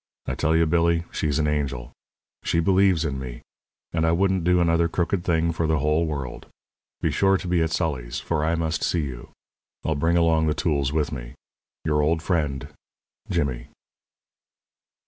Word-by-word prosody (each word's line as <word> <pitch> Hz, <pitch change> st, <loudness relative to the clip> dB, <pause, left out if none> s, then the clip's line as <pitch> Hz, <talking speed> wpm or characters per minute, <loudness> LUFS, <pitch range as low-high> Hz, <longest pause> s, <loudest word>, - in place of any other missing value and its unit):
I -, -, -2 dB
tell 80 Hz, +1 st, +1 dB
you, 80 Hz, 0 st, +4 dB
Billy, 85 Hz, +1 st, +2 dB
she's 75 Hz, -2 st, -1 dB
an 75 Hz, -, +1 dB
angel. 70 Hz, -5 st, -2 dB, 0.5 s
She 85 Hz, -, +1 dB
believes 95 Hz, -2 st, +3 dB
in 70 Hz, -3 st, -2 dB
me; 60 Hz, -2 st, -7 dB, 0.5 s
and 80 Hz, -1 st, +1 dB
I 80 Hz, -, +3 dB
wouldn't 95 Hz, +1 st, +2 dB
do 90 Hz, +1 st, +3 dB
another 85 Hz, -1 st, +3 dB
crooked 85 Hz, +2 st, -1 dB
thing 85 Hz, -1 st, +1 dB
for 85 Hz, 0 st, -1 dB
the 80 Hz, 0 st, +2 dB
whole 75 Hz, +3 st, +1 dB
world. 70 Hz, -5 st, -5 dB, 0.5 s
Be -, -, +1 dB
sure 95 Hz, 0 st, +3 dB
to 90 Hz, -, -7 dB
be 90 Hz, -1 st, +2 dB
at 80 Hz, -, +1 dB
Sully's, 75 Hz, -7 st, -2 dB
for 80 Hz, -3 st, -1 dB
I 80 Hz, +2 st, +1 dB
must 80 Hz, -1 st, -1 dB
see 85 Hz, -, +1 dB
you. 65 Hz, -4 st, -7 dB, 0.6 s
I'll 80 Hz, -, +1 dB
bring 80 Hz, +4 st, +1 dB
along 80 Hz, -2 st, +3 dB
the 75 Hz, -, +1 dB
tools 70 Hz, -4 st, 0 dB
with 75 Hz, -1 st, 0 dB
me. -, -, -7 dB, 0.5 s
Your 75 Hz, -1 st, +2 dB
old 80 Hz, +2 st, +1 dB
friend, 75 Hz, -7 st, -1 dB, 0.6 s
JIMMY. 60 Hz, -4 st, -1 dB
80 Hz, 175 wpm, -24 LUFS, 75-85 Hz, 0.6 s, you